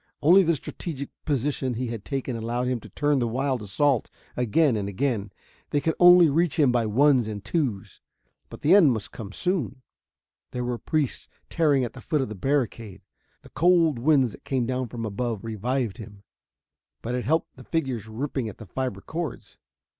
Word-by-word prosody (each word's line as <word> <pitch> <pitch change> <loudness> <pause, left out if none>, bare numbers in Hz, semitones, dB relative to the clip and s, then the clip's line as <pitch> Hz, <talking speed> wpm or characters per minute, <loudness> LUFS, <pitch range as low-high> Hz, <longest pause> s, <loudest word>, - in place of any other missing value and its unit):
Only 175 +6 +7
the 170 -3 +2
strategic 140 -1 -6
position 135 -3 -1
he 125 +3 -2
had 115 -3 -5
taken 130 +4 -3
allowed 120 +2 -2
him 125 -1 -1
to - - -13
turn 145 -1 +1
the 120 - 0
wild 130 +1 -1
assault 120 +4 +1 0.3
again 125 +3 +2
and 100 -2 -2
again. 105 -1 -1 0.4
They 145 - +1
could 160 +3 0
only 175 -1 +8
reach 165 +2 +1
him 145 -5 +4
by 120 -2 +1
ones 130 +1 +3
and 105 -2 -6
twos, 130 - -2 0.5
but - - -11
the 155 - +4
end 170 -10 +7
must 110 -3 -5
come 105 -4 -8
soon. 145 - -2 0.7
There 125 - -2
were 120 -1 -3
priests 155 -5 -2 0.2
tearing 150 -5 +3
at 120 - -4
the 130 - -11
foot 150 +5 0
of 130 - -3
the - - -5
barricade.... 115 -4 -2 0.4
The - - -15
cold 165 -5 +3
winds 135 -2 +3
that - - -14
came 130 -3 -1
down 130 +1 -2
from 115 0 -5
above 110 0 -3
revived 115 +1 -2
him, 105 -2 -11 0.8
but 120 - -3
it 125 -1 -2
helped 160 +4 0
the - - -12
figures 130 - -2
ripping 125 +1 -3
at 105 - -11
the 110 - -10
fiber 130 -7 -4
cords. 160 - -6
130 Hz, 185 wpm, -25 LUFS, 115-145 Hz, 0.8 s, only